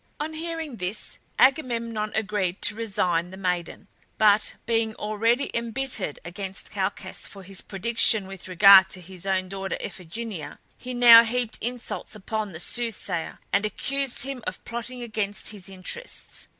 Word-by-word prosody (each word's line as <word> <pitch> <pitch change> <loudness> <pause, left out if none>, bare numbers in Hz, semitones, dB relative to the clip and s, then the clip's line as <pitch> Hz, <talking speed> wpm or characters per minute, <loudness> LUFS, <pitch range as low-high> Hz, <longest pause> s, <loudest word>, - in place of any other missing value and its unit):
On 310 +2 -3
hearing 320 -4 -5
this 180 +3 -3 0.2
Agamemnon 235 -6 +2
agreed 205 -4 -1
to 205 - +2
resign 180 -6 0
the 190 - -10
maiden; 180 -3 -3 0.3
but 210 0 +4
being 225 -1 +1
already 230 +5 0
embittered 235 - 0
against 190 +2 -5
Calchas - - -3
for 195 -1 -11
his 195 0 -1
prediction 220 0 +2
with 195 -1 -8
regard 190 +1 +8
to 185 - -4
his 185 +1 -8
own 190 -1 +1
daughter 195 0 -4
Iphigenia, 180 -3 -6 0.2
he 250 0 -6
now 235 -1 +10
heaped 235 0 -2
insults 245 -2 -4
upon 215 0 -3
the 160 - -8
soothsayer 220 -5 -2 0.2
and 205 - +3
accused 270 +5 -1
him 265 -3 -5
of 185 - -5
plotting 240 +1 -6
against 215 -3 -2
his 195 -4 -8
interests. 195 - -5
215 Hz, 145 wpm, -25 LUFS, 190-235 Hz, 0.3 s, now